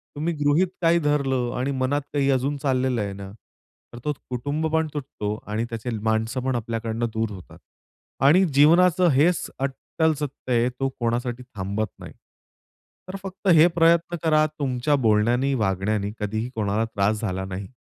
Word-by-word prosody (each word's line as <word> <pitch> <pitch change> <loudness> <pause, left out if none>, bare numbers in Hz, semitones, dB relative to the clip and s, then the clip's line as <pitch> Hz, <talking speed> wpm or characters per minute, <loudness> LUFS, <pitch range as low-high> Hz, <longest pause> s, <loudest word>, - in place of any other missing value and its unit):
तुम्ही 160 +4 -1
गृहीत 145 +6 +3
काही 170 0 +4
धरलं 135 -5 0
आणि 130 +3 -1
मनात 140 +3 +1
काही 140 -1 +1
अजून 135 +2 0
चाललेलं 130 -4 0
आहे 100 -1 -3
ना, 95 0 -9 0.6
तर 120 - -8
तो 150 - +1 0.2
कुटुंब 145 +6 -2
पण 160 0 +2
तुटतो. 130 -8 -4
आणि 110 +2 -2
त्याचे 115 0 -5
माणसं 110 +3 0
पण 130 -1 0
आपल्याकडनं 115 0 -2
दूर 110 -1 -1
होतात. 95 -3 -11 0.7
आणि 170 +7 +6
जीवनाचं 170 +5 +5
हेच 160 +6 +2
अट्टल 140 +4 -1
सत्य 140 -3 -4
आहे 120 +1 +3
तो 135 +2 -2
कोणासाठी 120 +1 -2
थांबत 100 +2 -2
नाही. - - -10 0.9
तर 185 - -6
फक्त 195 +1 -7
हे 160 +2 +7
प्रयत्न 170 0 +3
करा, 155 -1 +4
तुमच्या 135 +1 +1
बोलण्याने 120 +6 +3
वागण्याने 100 -2 0
कधीही 110 +3 -2
कोणाला 105 0 0
त्रास 105 -1 0
झाला 95 -3 -2
नाही 95 +1 -6
130 Hz, 155 wpm, -24 LUFS, 110-150 Hz, 0.9 s, हे